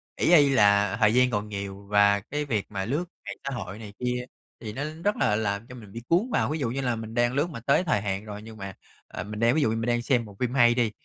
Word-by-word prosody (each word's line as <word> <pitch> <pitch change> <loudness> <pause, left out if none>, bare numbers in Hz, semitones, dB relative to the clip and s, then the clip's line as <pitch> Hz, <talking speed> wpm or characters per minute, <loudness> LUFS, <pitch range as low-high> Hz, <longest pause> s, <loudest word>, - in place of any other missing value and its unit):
ỷ 175 - +2
y 145 -3 +6
là 100 -4 +4
thời 110 -1 +4
gian 125 +1 +4
còn 105 0 -2
nhiều 100 -1 -6
và 100 0 +4
cái 145 +9 -4
việc 110 -8 -1
mà 95 -2 -3
lướt 145 - -1 0.2
mạng 100 -1 -5
xã 135 - -3
hội 100 -2 -6
này 105 -2 -9
kia 125 0 -1 0.3
thì 110 -2 -6
nó 135 +5 -4 0.2
rất 205 +2 +2
là 105 - +2
làm 105 +1 -2
cho 125 - -10
mình 110 -5 -12
bị 115 - -7
cuốn 185 +9 +2
vào. - - +1
Ví 155 - -2
dụ 130 -5 -1
như 135 +3 -2
là 125 -2 0
mình 110 0 -7
đang 120 +1 +2
lướt 145 +5 +1
mà 140 - -7
tới 140 +8 +2
thời 155 - +1
hạn 100 0 -3
rồi 105 -1 -7
nhưng 110 0 -11
mà, 100 -1 -7 0.3
ờ, - - -6
mình 105 +2 -7
đang 115 +4 +3
ví 155 - +2
dụ 110 - +3
như 110 - 0
mình 115 +1 -2
đang 120 0 +1
xem 120 -1 +1
bộ 100 -2 -13
phim 125 -1 -1
hay 120 -3 +5
đi, 120 -3 +1
115 Hz, 295 wpm, -26 LUFS, 105-125 Hz, 0.3 s, y